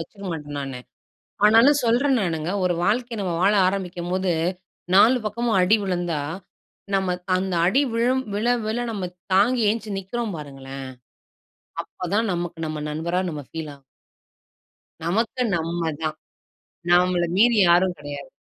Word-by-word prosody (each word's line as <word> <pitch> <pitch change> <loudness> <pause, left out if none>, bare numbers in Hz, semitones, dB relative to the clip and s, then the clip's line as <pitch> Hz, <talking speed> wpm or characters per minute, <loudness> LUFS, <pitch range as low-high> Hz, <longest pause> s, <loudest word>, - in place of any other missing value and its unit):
வச்சுக்க 200 +4 -10
மாட்டேன் 145 -2 -6
நானு. 135 -2 -5 0.7
ஆனாலும் 230 +7 +6
சொல்றன் 250 +3 +3
நானுங்க, 165 -2 -2
ஒரு 180 -1 +2
வாழ்க்கை 235 +4 0
நம்ம 180 -3 -2
வாழ 200 +3 +4
ஆரம்பிக்கும்போது, 185 -1 -2 0.6
4 230 +6 +7
பக்கமும் 225 0 0
அடி 185 +4 +5
விழுந்தா, 175 -5 -1 0.7
நம்ம 190 -1 0 0.2
அ - - +5
அந்த 185 -1 -2
அடி 245 +11 +3
விழும் 250 +3 +1
விழ, 210 +3 -1 0.2
விழ 220 - -1
நம்ம 195 -5 -4 0.3
தாங்கி 230 +5 +3
எழுந்ச்சி 220 0 -2
நிக்கிறோம் 220 +2 -4
பாருங்களேன்! 135 -2 -8 1.0
அப்ப 180 - -7
தான் 225 0 +1
நமக்கு 175 -1 -4
நம்ம 155 -1 -4
நண்பரா 170 +4 -1
நம்ம 150 -3 -6
ஃபீல் 160 -2 -6
ஆ - - -18 1.3
நமக்கு 225 +8 0
நம்ம 165 0 -2
தான், 155 0 -2 0.7
நம்மள 180 0 +4
மீறி 235 +2 +5
யாரும் 175 +1 +4
கெடையாது. 145 -1 -8
185 Hz, 135 wpm, -23 LUFS, 165-220 Hz, 1.3 s, 4